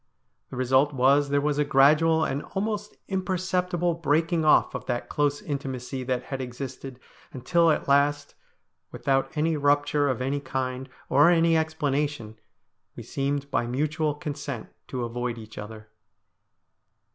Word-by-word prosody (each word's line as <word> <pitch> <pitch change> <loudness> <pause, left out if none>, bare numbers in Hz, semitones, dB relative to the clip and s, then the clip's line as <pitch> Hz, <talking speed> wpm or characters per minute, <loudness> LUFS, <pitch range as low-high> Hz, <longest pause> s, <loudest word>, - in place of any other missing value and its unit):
The - - -8
result 130 +3 +2
was 140 +3 +3
there 145 0 +2
was 145 0 0
a - - +4
gradual 155 +4 +4
and 140 +2 -2
almost 210 +1 -3
imperceptible 180 -2 -1
breaking 165 +1 +1
off 155 - +4
of - - -5
that 120 -1 -3
close 145 -1 0
intimacy 135 -2 -4
that 125 -1 -1
had 135 -1 -5
existed, 130 +1 -7 0.3
until 165 +6 +2
at 155 - 0
last, 145 +1 +2 0.6
without 135 -1 0
any 160 +1 +1
rupture 145 0 +2
of 130 - -1
any 135 +3 -1
kind, 130 -1 -4 0.2
or 145 +4 +5
any 165 -1 +4
explanation, 145 -7 -1 0.6
we - - -8
seemed 140 0 -3
by 120 - 0
mutual 150 +4 -1
consent 145 -6 -6 0.2
to 125 -2 -4
avoid 120 0 -3
each 110 -1 -10
other. 110 +1 -9
145 Hz, 140 wpm, -26 LUFS, 130-155 Hz, 0.6 s, or